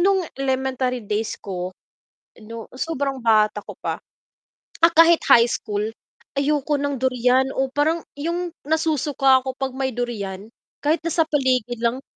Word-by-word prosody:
nung 380 Hz, 0 st, +3 dB
elementary 260 Hz, -2 st, -1 dB
days 210 Hz, +2 st, -2 dB
ko 185 Hz, -2 st, -5 dB, 0.7 s
'no 225 Hz, +1 st, -9 dB
sobrang 275 Hz, -1 st, -2 dB
bata 215 Hz, -2 st, +3 dB
ko -, -, -9 dB
pa. -, -, -2 dB, 0.9 s
Ah, 335 Hz, -, +6 dB
kahit 330 Hz, +1 st, +6 dB
high 235 Hz, 0 st, +7 dB
school, 205 Hz, -2 st, -2 dB, 0.6 s
ayoko 295 Hz, +1 st, +1 dB
ng 285 Hz, 0 st, -1 dB
durian 255 Hz, 0 st, +3 dB
o 265 Hz, 0 st, +2 dB
parang 315 Hz, +4 st, +1 dB, 0.2 s
yung 340 Hz, +4 st, -2 dB, 0.2 s
nasusuka 295 Hz, -4 st, +2 dB
ko 265 Hz, -, -2 dB
pag 270 Hz, -1 st, -2 dB
may 265 Hz, 0 st, -1 dB
durian 205 Hz, -5 st, -4 dB, 0.4 s
kahit 310 Hz, +3 st, +3 dB
nasa 335 Hz, -1 st, +2 dB
paligid 255 Hz, -5 st, +1 dB
lang. 240 Hz, +3 st, 0 dB
265 Hz, 140 wpm, -22 LUFS, 235-295 Hz, 0.9 s, high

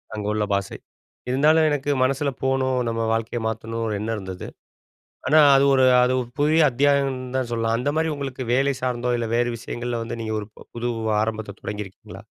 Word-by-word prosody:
அங்க 105 Hz, -, -4 dB
உள்ள 105 Hz, 0 st, 0 dB
பாஷை. 100 Hz, 0 st, -2 dB, 0.5 s
இருந்தாலும் 155 Hz, +4 st, +4 dB
எனக்கு 145 Hz, -1 st, -2 dB
மனசுல 140 Hz, +2 st, +1 dB
போணும், 130 Hz, -1 st, +1 dB
நம்ம 115 Hz, 0 st, -2 dB
வாழ்க்கைய 115 Hz, +1 st, -2 dB
மாத்தணும்ன்னு 115 Hz, +1 st, -3 dB
ஒரு 105 Hz, -, -1 dB
எண்ணம் 115 Hz, +1 st, -2 dB
இருந்தது. 95 Hz, -2 st, -7 dB, 0.8 s
ஆனா, 155 Hz, +1 st, +6 dB, 0.2 s
அது 135 Hz, -, +4 dB
ஒரு 130 Hz, -1 st, +4 dB, 0.2 s
அது 125 Hz, +1 st, +3 dB
ஒரு 120 Hz, -, -10 dB
புதிய 155 Hz, +2 st, +4 dB
அத்தியாயம்ன்னு 135 Hz, -1 st, +1 dB
தான் 125 Hz, -2 st, -2 dB
சொல்லணும். 115 Hz, 0 st, 0 dB
அந்த 125 Hz, -, -2 dB
மாரி 160 Hz, 0 st, +1 dB
உங்களுக்கு 135 Hz, -2 st, -5 dB
வேலை 140 Hz, +2 st, +2 dB
சார்ந்தோ 125 Hz, -1 st, -1 dB
இல்ல 115 Hz, -1 st, -2 dB
வேறு 120 Hz, 0 st, +2 dB
விஷயங்கள்ல 120 Hz, +1 st, -4 dB
வந்து 115 Hz, -, -6 dB
நீங்க 110 Hz, -1 st, -3 dB
ஒரு 105 Hz, -, -8 dB, 0.3 s
புது 120 Hz, +1 st, -2 dB, 0.3 s
ஆரம்பத்த 110 Hz, -2 st, -4 dB
தொடங்கிருக்கீங்களா? 105 Hz, -2 st, -8 dB
120 Hz, 175 wpm, -23 LUFS, 115-135 Hz, 0.8 s, ஆனா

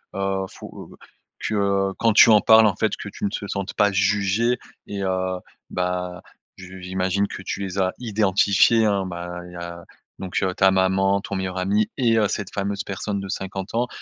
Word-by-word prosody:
heu, 95 Hz, -1 st, -1 dB
faut -, -, -11 dB, 0.4 s
que, -, -, -3 dB
heu, 100 Hz, -1 st, +1 dB
quand 115 Hz, -1 st, +3 dB
tu 115 Hz, +1 st, +8 dB
en 105 Hz, -, +6 dB
parles, 110 Hz, 0 st, +7 dB
en 100 Hz, -4 st, +2 dB
fait, -, -, 0 dB
que -, -, -7 dB
tu -, -, -11 dB
ne -, -, +1 dB
te 100 Hz, 0 st, -5 dB
sentes 100 Hz, 0 st, -4 dB
pas 105 Hz, 0 st, +3 dB
juger 100 Hz, +5 st, +1 dB, 0.3 s
et 100 Hz, -1 st, -4 dB
heu, 95 Hz, -1 st, -1 dB, 0.3 s
bah, 90 Hz, 0 st, -3 dB, 0.3 s
je 95 Hz, 0 st, -10 dB
j'imagine 95 Hz, +2 st, -1 dB
que -, -, -8 dB
tu 100 Hz, +1 st, -4 dB
les 95 Hz, 0 st, -3 dB
as 95 Hz, -1 st, +1 dB
identifiés, 110 Hz, 0 st, +3 dB
hein, 100 Hz, -2 st, +1 dB
bah, 90 Hz, 0 st, -6 dB
il 90 Hz, -, -13 dB
y -, -, -11 dB
a 85 Hz, 0 st, -7 dB, 0.4 s
donc, 95 Hz, -1 st, -5 dB
heu, 95 Hz, -1 st, 0 dB
ta 95 Hz, +1 st, +4 dB
maman, 95 Hz, +1 st, +2 dB
ton 100 Hz, -, -5 dB
meilleur 95 Hz, -1 st, -3 dB
ami 100 Hz, +3 st, +1 dB
et 115 Hz, -4 st, +3 dB
heu, 105 Hz, -, +3 dB
cette 100 Hz, -1 st, -4 dB
fameuse 100 Hz, 0 st, -2 dB
personne 100 Hz, +1 st, -4 dB
de 95 Hz, -, -7 dB
50 95 Hz, 0 st, -5 dB
ans, 120 Hz, +2 st, +1 dB
95 Hz, 200 wpm, -23 LUFS, 95-100 Hz, 0.4 s, tu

